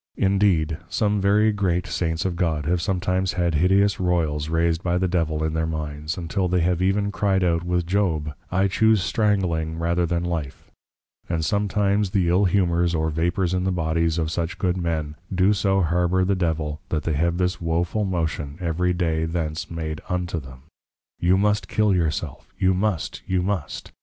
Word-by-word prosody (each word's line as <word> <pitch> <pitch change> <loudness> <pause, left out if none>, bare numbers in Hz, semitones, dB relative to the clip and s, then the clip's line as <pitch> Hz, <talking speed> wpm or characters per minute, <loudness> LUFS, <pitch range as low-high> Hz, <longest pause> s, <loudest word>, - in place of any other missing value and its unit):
Indeed, 95 -6 +2
some 105 -1 +1
very 105 +2 +4
great 90 -4 0
Saints 80 -1 -2
of 90 -2 -1
God, 80 -4 -1
have 85 +2 +1
sometimes 95 0 0
had 85 -2 0
hideous 95 +5 +3
Royls 80 -5 0
raised 85 0 +1
by 90 -2 0
the 95 +1 +1
Devil 80 -3 0
in 80 0 -1
their 80 0 0
minds; 75 0 -4
untill 90 +2 -1
they 90 0 +1
have 90 +1 +1
e'en 100 +2 +1
cry'd 95 -2 +1
out 85 -1 +1
with 90 -1 0
Job, 85 -5 0 0.2
I 95 +2 +2
choose 110 0 +3
strangling 95 -7 0
rather 85 +1 0
than 85 +1 -1
Life; 80 -6 -5 0.6
and 80 -2 -1
sometimes 100 +1 +1
the 90 -3 +1
ill 95 +4 +3
Humours 85 -2 +2
or 80 0 0
Vapours 85 +3 0
in 90 0 0
the 95 - 0
Bodies 80 -1 0
of 80 -1 -1
such 85 +3 -3
Good 90 -2 0
Men, 80 -4 -2
do 95 +2 +3
so 95 -1 +1
harbour 90 +2 +1
the 100 - +2
Devil 80 -4 -2
that 80 -1 -1
they 80 - -1
have 85 +3 +1
this 90 0 -1
woful 85 +5 0
motion 80 -6 -2
every 90 +1 0
day 80 -2 0
thence 80 -1 -3
made 80 -2 -4
unto 90 -1 -2
them; 65 -2 -12 0.6
_You 90 +2 +4
must 105 +1 +1
Kill 105 -2 +2
your 85 -3 +2
self! 75 -2 -6
you 95 -1 +3
must! 95 -2 -1
you 95 -1 +1
must! 95 -5 -3
90 Hz, 180 wpm, -23 LUFS, 80-95 Hz, 0.6 s, very